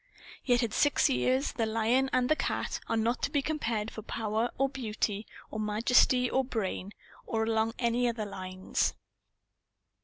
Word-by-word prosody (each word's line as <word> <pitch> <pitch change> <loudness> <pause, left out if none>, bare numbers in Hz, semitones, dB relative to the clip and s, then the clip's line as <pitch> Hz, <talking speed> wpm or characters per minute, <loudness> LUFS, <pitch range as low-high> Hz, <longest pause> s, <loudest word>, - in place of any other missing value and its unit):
Yet 245 -1 +3
at 225 - -2
six 290 -1 +3
years, 260 +1 +1
the 225 -2 -1
lion 230 +4 +2
and 250 -1 +2
the 310 - +3
cat - - -2
are 225 - +1
not 230 +3 0
to - - 0
be 285 -2 0
compared 230 -9 -2
for 220 - -7
power 220 +1 -1
or 270 - +3
beauty 220 -5 -3 0.2
or 215 - -4
majesty 240 +4 +3
or 265 +2 +1
brain, 205 -5 -3 0.4
or 220 -1 0
along 225 0 0
any 240 0 +1
other 225 -2 -3
lines. 185 -1 -2
230 Hz, 160 wpm, -30 LUFS, 220-255 Hz, 0.4 s, Yet